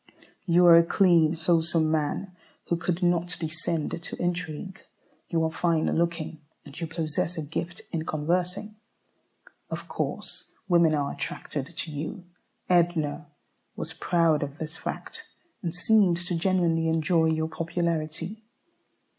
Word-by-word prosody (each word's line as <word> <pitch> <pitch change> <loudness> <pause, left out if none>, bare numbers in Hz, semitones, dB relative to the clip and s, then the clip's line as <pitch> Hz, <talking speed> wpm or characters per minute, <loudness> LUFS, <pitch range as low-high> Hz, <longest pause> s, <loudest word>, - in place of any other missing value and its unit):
You 175 +1 +5
are 170 -1 +10
a 170 - +7
clean, 170 -3 +4
wholesome 165 -1 +2
man, 160 +4 -1 0.3
who 170 - +3
could 175 +1 -2
not 175 0 +1
descend 160 0 -2
to - - -7
intrigue. 175 +1 -3 0.5
You 165 -2 +1
are 160 - +1
fine 165 -1 +1
looking, 165 -2 -1 0.2
and 145 +3 -10
you 165 - -1
possess 160 +1 -2
a 160 - -2
gift 165 +3 -4
in 160 -2 -1
conversing. 180 +7 -1 0.9
Of - - -5
course - - -4
women 170 -4 +5
are 140 -1 0
attracted 145 +2 -5
to 160 - -3
you. 160 +6 -5 0.4
Edna 165 -4 +2 0.5
was 160 - -4
proud 165 -3 +2
of 145 0 -4
this 160 0 -6
fact, 455 - -6 0.3
and 170 -4 -3
seemed 190 -2 +4
to 175 0 -2
genuinely 170 -2 +2
enjoy 160 +1 +3
your 160 0 +1
popularity. 165 +4 -2
165 Hz, 135 wpm, -27 LUFS, 160-175 Hz, 0.9 s, are